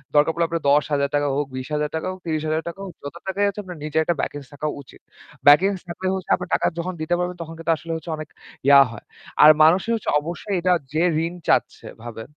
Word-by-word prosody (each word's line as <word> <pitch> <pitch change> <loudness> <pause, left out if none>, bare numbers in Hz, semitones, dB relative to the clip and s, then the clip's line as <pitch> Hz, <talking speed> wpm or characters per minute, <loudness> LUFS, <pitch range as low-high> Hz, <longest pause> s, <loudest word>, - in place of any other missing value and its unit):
দরকার 150 +2 +5
পড়লে 170 +1 0
আপনার 165 -1 -3
৳১০,০০০ 145 0 +1
হোক, 145 -1 -1
৳২০,০০০ 150 +4 -3
হোক 185 - -9
৳৩০,০০০ 160 +2 -2
হোক, 185 - -9
যত 145 +3 -7
টাকাই 195 +2 0
আছে 200 - -7
আপনার 180 -3 -9
নিজের 155 +1 0
একটা 170 +2 0
ব্যাকিংস 145 -2 -5
থাকা 145 +2 -4
উচিত। 140 - -17 0.5
ব্যাকিংস 185 +7 +6
থাকলে 185 +2 -4
হচ্ছে 190 -1 -7
আপনার 180 - -7
টাকা - - +1
যখন 180 +2 -3
দিতে 165 +3 0
পারবেন, 180 0 -2
তখন 165 0 -7
কিন্তু 165 0 0
আসলে 165 +1 -6
হচ্ছে 160 +1 -7
অনেক 155 -1 -8 0.4
ইয়া 140 0 +9
হয়। 115 - -11 0.4
আর 155 - +11
মানুষে 175 +7 +4
হচ্ছে 225 - -4
অবশ্যই 175 +6 -4
এটা 180 +1 +3 0.2
যে 155 - +1 0.2
ঋণ 170 - -4
চাচ্ছে - - +1 0.2
ভাবে, 115 -2 -7
160 Hz, 205 wpm, -22 LUFS, 145-180 Hz, 0.5 s, আর